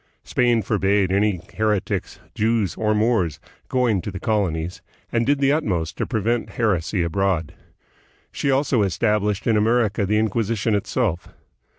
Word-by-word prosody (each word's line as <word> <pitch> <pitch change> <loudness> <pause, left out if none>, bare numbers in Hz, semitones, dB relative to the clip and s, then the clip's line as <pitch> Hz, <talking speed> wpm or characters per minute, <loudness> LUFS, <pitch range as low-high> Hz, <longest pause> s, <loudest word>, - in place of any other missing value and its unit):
Spain 120 -3 +1
forbade 100 -1 +1
any 100 -1 +2 0.2
heretics, 105 -3 -1
Jews, 110 -2 +1
or 110 -1 +1
Moors 105 -8 +1 0.3
going 120 -7 +1
to - - -5
the 95 -1 -6
colonies, 90 -7 -1 0.3
and 115 0 0
did 145 +1 +3
the 140 0 +2
utmost 95 - -1
to - - -2
prevent 115 +2 -1
heresy 95 -4 +1
abroad. 85 -2 -1 0.8
She 140 - -2
also 135 -3 +2
established 105 +2 0
in 115 - +3
Amer 115 +2 +3
ica 100 -1 -2
the 105 +2 +2
Inquisition 110 0 0
itself. 100 -3 -1
105 Hz, 145 wpm, -22 LUFS, 95-115 Hz, 0.8 s, did